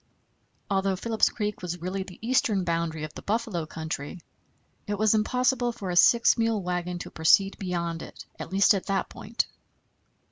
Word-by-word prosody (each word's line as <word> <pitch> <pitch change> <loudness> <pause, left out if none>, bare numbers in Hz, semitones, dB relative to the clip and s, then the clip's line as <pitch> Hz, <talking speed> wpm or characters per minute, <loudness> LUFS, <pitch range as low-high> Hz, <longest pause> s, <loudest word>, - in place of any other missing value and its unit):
Although 195 -1 +1
Phillips 220 +3 +1
Creek 210 -3 -3
was 175 -1 -4
really 185 +3 -3
the 190 -1 -9
eastern 220 -6 +2
boundary 165 -2 -2
of 155 - -6
the - - -8
buffalo 210 -7 -2
country, 160 +1 -5 0.7
it 205 0 -2
was 215 +1 +3
impossible 245 +3 +1
for 200 -6 -5
a - - -2
six 235 +6 +5
mule 225 -3 +1
wagon 180 0 -2
to - - -8
proceed 195 +5 +4
beyond 170 -3 -3
it, - - -10
at - - -7
least 195 +2 +5
at 195 - -3
that 195 -1 0
point. 220 +3 -2
195 Hz, 170 wpm, -27 LUFS, 175-220 Hz, 0.7 s, six